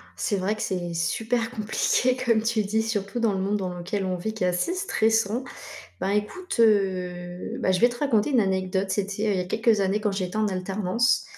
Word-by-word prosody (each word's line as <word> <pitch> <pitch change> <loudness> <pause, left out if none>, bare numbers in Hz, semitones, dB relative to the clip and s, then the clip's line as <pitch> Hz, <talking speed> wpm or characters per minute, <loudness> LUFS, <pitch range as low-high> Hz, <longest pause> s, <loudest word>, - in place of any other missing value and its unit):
C'est 205 -6 -1
vrai 195 +3 0
que 215 - -7
c'est 175 -3 -2
super 225 +7 -1
compliqué 245 +2 +1
comme 230 -3 +2
tu 225 -2 +1
dis, 220 +3 0
surtout 210 0 -2
dans 225 -3 +2
le 190 - -2
monde 200 +2 0
dans 185 -3 -3
lequel 190 +3 -3
on 185 - -1
vit 215 +5 -4
qui 220 -4 -3
est - - +3
assez 180 - 0
stressant, 225 - +1 0.6
ben, 190 - -1
écoute, 210 - -2
heu, 185 -5 +1
beh, 185 - +2
je 185 - +1
vais 240 - +6
te 240 0 -7
raconter 255 -4 +2
une 255 -4 +4
anecdote, 190 -1 0
c'était 205 +1 -2
il - - 0
y - - 0
a - - -2
quelques 225 +3 +2
années 195 +2 +1
quand 210 - 0
j'étais 190 +1 -3
en 215 -1 +2
alternance, 195 +5 0
205 Hz, 215 wpm, -25 LUFS, 185-225 Hz, 0.6 s, vais